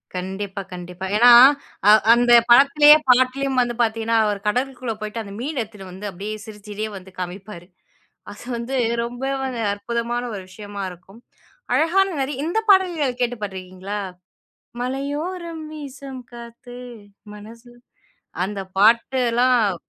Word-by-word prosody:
கண்டிப்பா, 190 +2 -5
கண்டிப்பா. 180 +1 -7
ஏனா 240 +3 +6 0.6
அ - - +9 0.2
அந்த 240 0 +2 0.2
படத்திலேயே 295 +4 +7
பாட்டுலயும் 260 +1 +2
வந்து 240 -1 -1
பாத்தீங்கன்னா, 225 0 0
அவர் 205 -1 -1
கடலுக்குள்ள 250 0 -2
போயிட்டு 215 +2 -5
அந்த 200 -1 -10
மீன் 275 +2 -4
எடுத்துட்டு 210 -3 -9
வந்து 190 +3 -9
அப்டியே 205 +4 -6
சிரிச்சிட்டே 210 0 -7
வந்து 190 0 -13
காமிப்பாரு. 180 0 -8 0.6
அது 205 - -12
வந்து 235 +3 -4 0.3
ரொம்ப 245 +2 -7 0.5
அற்புதமான 235 +3 -3
ஒரு 195 - -6
விஷயமா 205 0 -8
இருக்கும். 185 +5 -16 0.6
அழகான 380 +5 +3
நெறைய 270 0 -3
இந்த 355 +6 -1
பாடல்கள் 335 -10 +2
கேட்டு 245 0 0
பாத்துருகீங்களா? 190 +1 -6 0.8
"மலையோரம் 315 +6 -4
வீசம் 275 -3 -9
காத்து 235 +1 -11 0.6
மனச" 220 +3 -12 0.8
அந்த 200 0 -5 0.2
பாட்டெல்லாம் 235 0 +3
235 Hz, 120 wpm, -21 LUFS, 205-265 Hz, 0.8 s, அ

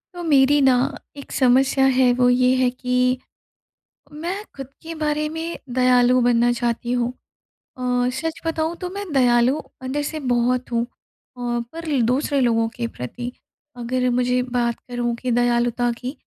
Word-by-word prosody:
तो 350 - -6
मेरी 290 -2 +4
ना 265 -1 +5 0.4
एक 280 - -10
समस्या 265 +1 +3
है, 260 -1 +4
वो 245 0 +3
ये 250 +1 +3
है 255 -1 +2
कि, 250 0 0 0.9
मैं 345 +7 -4
ख़ुद 270 -2 -7 0.2
के 330 +1 -6
बारे 305 -1 -1
में 325 +2 -5 0.2
दयालु 250 0 +4
बनना 240 0 +3
चाहती 240 0 -2
हूँ 245 0 0 0.7
अ, 250 0 0
सच 320 +5 -4
बताऊँ 325 +1 -1
तो 360 - -3
मैं 400 +2 -5
दयालु 250 +1 +3 0.2
अंदर 265 +3 -2
से 310 +2 -4
बहुत 245 +1 0
हूँ, 235 0 +1
अ, 240 -1 -7
पर 320 -5 -2
दूसरे 270 +4 +1
लोगों 230 -2 +2
के 235 - -2
प्रति, 240 - -6 0.4
अगर 250 +1 -1
मुझे 250 +1 +1 0.2
बात 235 -1 +1
करूँ 240 -1 -2
कि 250 +1 -4
दयालुता 240 0 +1
की, 255 +1 -4
250 Hz, 155 wpm, -22 LUFS, 245-280 Hz, 0.9 s, ना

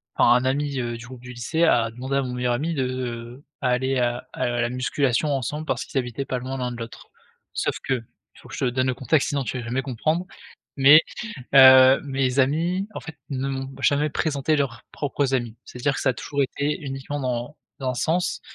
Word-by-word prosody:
enfin, 120 - +5
un 125 +1 +3
ami, 140 +1 0
heu, 120 -1 -3
du 115 - -10
groupe 125 -1 -11
du 125 0 -9
lycée 140 +8 -1
a 115 -8 +3
demandé 130 +4 -4
à - - +2
mon 125 -1 -4
meilleur 125 0 0
ami 155 +7 -1
de, 135 -4 0
heu, 125 0 -5 0.2
à 130 - +1
aller 130 +2 +1
à 120 0 -1
à - - -1
la 120 - +1
musculation 125 +2 0
ensemble 145 +4 -3
parce 120 -6 -2
qu'ils - - -5
habitaient 125 +2 -4
pas 130 - -2
loin 130 +2 -5
l'un 125 -1 -2
de 120 - -7
l'autre. 115 0 -9 0.4
Sauf - - -1
que, 130 -3 0 0.3
faut - - -16
que - - -7
je - - -1
te 125 - +2
donne 130 +1 0
le 130 - +1
contexte 135 +3 +1
sinon 140 -1 -1
tu 130 - -4
vas 120 - -6
jamais 125 +3 -1
comprendre, 155 +7 -1 0.5
mais 145 +3 +9 0.6
heu, 130 0 +9
mes 135 -1 -1
amis, 170 +8 +1
en - - -5
fait, 160 -2 -10
ne 135 0 -2
m'ont 135 0 -4
jamais 145 +1 +2
présenté 150 0 0
leurs 135 -5 -2
propres 140 -1 -1
amis. 120 -3 -2
C'est-à-dire 130 +3 -2
que - - -3
ça 135 - +3
a - - -3
toujours 140 +4 -2
été 140 +2 -2
uniquement 135 +1 -5
dans 125 +2 -3 0.2
dans 130 - -1
1 125 - -3
sens, 170 +8 0
130 Hz, 225 wpm, -24 LUFS, 125-140 Hz, 0.6 s, mais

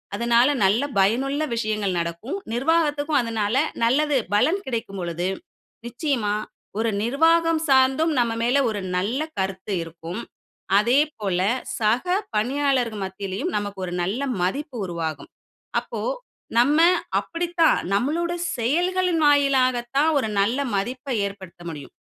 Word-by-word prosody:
அதனால 235 +4 +3
நல்ல 200 +6 +3 0.2
பயனுள்ள 265 +10 +2
விஷயங்கள் 215 -4 -1
நடக்கும். 170 - -4 0.2
நிர்வாகத்துக்கும் 295 +3 +1
அதனால 225 -3 -1 0.3
நல்லது 285 +5 +2 0.2
பலன் 315 - +3
கிடைக்கும் 225 -6 -4
பொழுது, 175 0 -2 0.6
நிச்சயமா 240 -4 -1 0.4
ஒரு 225 +1 +1
நிர்வாகம் 325 +5 +3
சார்ந்தும் 270 +4 +4
நம்ம 235 -1 +1
மேல 245 +4 +2
ஒரு 205 -2 -3 0.2
நல்ல 210 +9 -1 0.2
கருத்து 190 +1 -3
இருக்கும். 165 +4 -7 0.6
அதேபோல 235 -6 +1 0.4
சக 225 +7 +2 0.3
பணியாளர்கள் 250 -1 0
மத்தியிலயும் 195 - -4
நமக்கு 205 -2 -4
ஒரு 175 - -5
நல்ல 200 +8 -2 0.2
மதிப்பு 265 - -2
உருவாகும். 165 -4 -5 0.5
அப்போ - - -7 0.6
நம்ம 290 +6 +4 0.4
அப்டித்தான் 340 -1 +1 0.2
நம்மளோட 320 +10 0 0.3
செயல்களின் 350 +7 +1
வாயிலாகத்தான் 270 0 +3
ஒரு 255 - 0
நல்ல 215 +6 +2 0.2
மதிப்பை 250 +6 -2
ஏற்படுத்த 190 -3 -11
முடியும். 145 -4 -9
240 Hz, 110 wpm, -23 LUFS, 200-290 Hz, 0.6 s, சார்ந்தும்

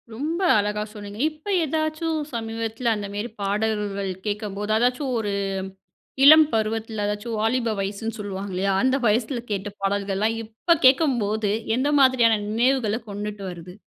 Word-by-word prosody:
ரொம்ப 315 - -2 0.2
அழகா 210 0 0
சொன்னீங்க. 205 0 -9
இப்ப 310 0 -20 0.2
ஏதாச்சும் 315 +1 -1
சமீபத்தில 225 +1 -2
அந்த 205 -1 -5
மேரி 205 +4 -3
பாடல்கள் 205 -1 -1
கேக்கம்போது 210 0 -3
அதாச்சும் 250 +4 +1
ஒரு 210 -2 -2 0.9
இளம் 310 +2 +9
பருவத்துல 220 0 -1
அதாச்சும் 210 +3 -3
வாலிப 225 +1 +1
வயசுன்னு 205 +4 -3
சொல்வாங்க 200 -1 -5
இல்லையா, 195 +2 0
அந்த 260 0 +3
வயசுல 235 +3 0
கேட்ட 200 0 -2
பாடல்கள்லாம், 200 +2 0
இப்ப 230 +10 +1
கேக்கும்போது 235 -7 +3 0.3
எந்த 280 +3 +1
மாதிரியான 240 -5 +4
நினைவுகள 235 -1 +1
கொண்டுட்டு 205 0 -5
வருது? 175 0 -9
220 Hz, 130 wpm, -24 LUFS, 205-250 Hz, 0.9 s, இளம்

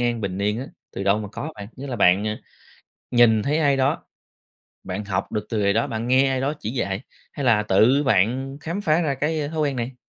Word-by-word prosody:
an, 120 -1 0
bình 95 -3 -3
yên 105 +2 0
á, 135 - -6 0.2
từ 95 - -5
đâu 100 +2 +3
mà 105 -2 -5
có 155 +7 -5
bạn? 100 0 -9
Nghĩa 140 +2 -7
là 125 -3 -4
bạn, 95 +1 +4
ờ, 105 0 -2 0.7
nhìn 115 -3 +5
thấy 150 +3 0
ai 145 -3 +3
đó 135 +1 0 0.8
bạn 95 +3 -4
học 95 -2 -3
được 105 -1 -2
từ 110 - -2
người 100 -1 +2
đó, 115 +2 +1
bạn 115 +1 -4
nghe 130 +2 +4
ai 130 -1 0
đó 140 +2 0
chỉ 105 - -3
dạy, 100 -6 -2 0.3
hay 140 - -4
là 110 -4 +4
tự 110 +8 +4
bạn 130 +3 +1
khám 170 +6 -4
phá 155 -3 +2
ra 150 -5 0
cái, 150 +3 -1
a, 145 - -2
thói 160 0 -3
quen 140 -3 0
này? 120 +2 -3
120 Hz, 245 wpm, -23 LUFS, 105-140 Hz, 0.8 s, nhìn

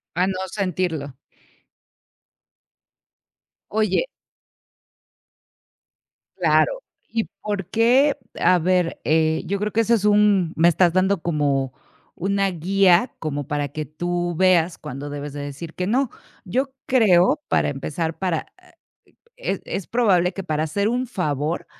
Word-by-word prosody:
A 180 +2 +2
no 185 -1 -2
sentirlo. 175 -7 -2 2.6
Oye 215 - +1 2.3
Claro. - - +2 0.3
¿Y 225 -1 -1 0.2
por 205 -4 -3
qué? 250 +6 +4 0.2
A 180 +1 +4
ver, 180 0 0
eh, 160 0 +2
yo 200 +4 -1
creo 210 +1 -2
que 225 - +2
ese 230 +1 +3
es 210 -3 0
un 205 -5 +3
me 165 +2 +5
estás 175 +1 +3
dando 185 +1 +2
como 140 -5 0 0.4
una 195 +2 0
guía 185 +4 +3
como 145 -3 -4
para 145 -2 -1
que 155 +2 -5
tú 175 +4 -3
veas 180 -2 +3
cuando 140 +3 -7
debes 145 0 -6
de 145 - -6
decir 145 +4 -7
que 180 - -3
no. 250 +4 +1 0.3
Yo 260 +8 -1
creo, 215 -1 +4
para - - +2
empezar, 155 +4 -3
para, 180 -4 -1
ah, - - -22 0.6
es - - -3
es 195 - -4
probable 195 -7 +2
que 195 - -5
para 155 -3 -1
hacer 200 +7 0
un 250 +2 -1
favor 155 - -2
180 Hz, 130 wpm, -22 LUFS, 155-205 Hz, 2.6 s, me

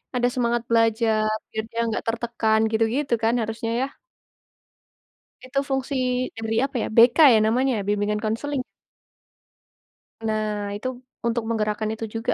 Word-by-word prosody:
ada 245 0 +2
semangat 240 -1 0
belajar, 225 -1 +2 0.2
biar 220 - -3
dia 230 - -4
nggak 215 - -3
tertekan, 225 -1 +1
gitu-gitu 230 +5 0
kan 225 +1 +3
harusnya 225 +1 -3
ya? - - +2 1.6
Itu 255 +2 -1
fungsi, 270 +1 -1 0.4
dari 225 0 -2
apa 275 - -8
ya, - - -2
BK 235 +3 +6 0.2
ya - - +5
namanya, 255 +2 +2
bimbingan 210 +1 0
konseling. 255 +6 -2 1.6
Nah, 215 -2 -2
itu, 210 +5 -4 0.4
untuk 235 0 0
menggerakkan 215 -1 -1
itu 225 0 -4
juga, 225 +2 -2
225 Hz, 130 wpm, -24 LUFS, 215-240 Hz, 1.6 s, BK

